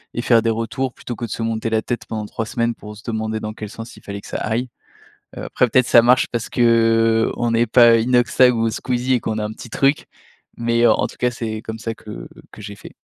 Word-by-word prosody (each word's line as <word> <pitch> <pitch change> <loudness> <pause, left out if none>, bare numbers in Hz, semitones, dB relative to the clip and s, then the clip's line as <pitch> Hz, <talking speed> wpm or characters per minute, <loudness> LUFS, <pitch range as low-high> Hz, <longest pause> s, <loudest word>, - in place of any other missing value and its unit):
et 120 - -1
faire 115 -2 +4
des 115 - 0
retours, 115 +3 -2
plutôt 120 - -7
que 120 - -5
de - - -9
se - - -4
monter 115 0 -2
la 110 0 +1
tête 120 - -4
pendant 110 -1 -4
3 110 +1 -4
semaines 115 0 -1
pour 105 -1 -11
se 100 - -15
demander 110 -1 -3
dans 110 0 -5
quel 105 -1 -8
sens 115 +1 -10
il - - -15
fallait 100 0 -7
que - - -13
ça - - -4
aille, 120 +3 -2 0.7
heu, - - -6
après 125 - +1
peut-être 130 +1 +3
ça 120 - +6
marche 125 +2 +4
parce 115 -2 -3
qu'on 115 0 +2
n'est 115 +1 +2
pas 115 0 +6
Inoxtag 125 +1 +3
ou 115 0 +1
Squeezie 125 +3 -1
et 120 - +1
qu'on 110 - -3
a 105 - -2
un 105 - -6
petit 115 +1 -11
truc, 140 +3 +1 0.5
mais, 115 0 +1
heu, - - +6
en - - +2
tout - - -13
cas 125 - +1
c'est 110 -2 -5
comme 110 0 -7
ça 115 0 -4
que 105 -1 -10 0.2
que - - -13
j'ai 100 0 -8
fait. - - -13
115 Hz, 250 wpm, -20 LUFS, 110-120 Hz, 0.7 s, ça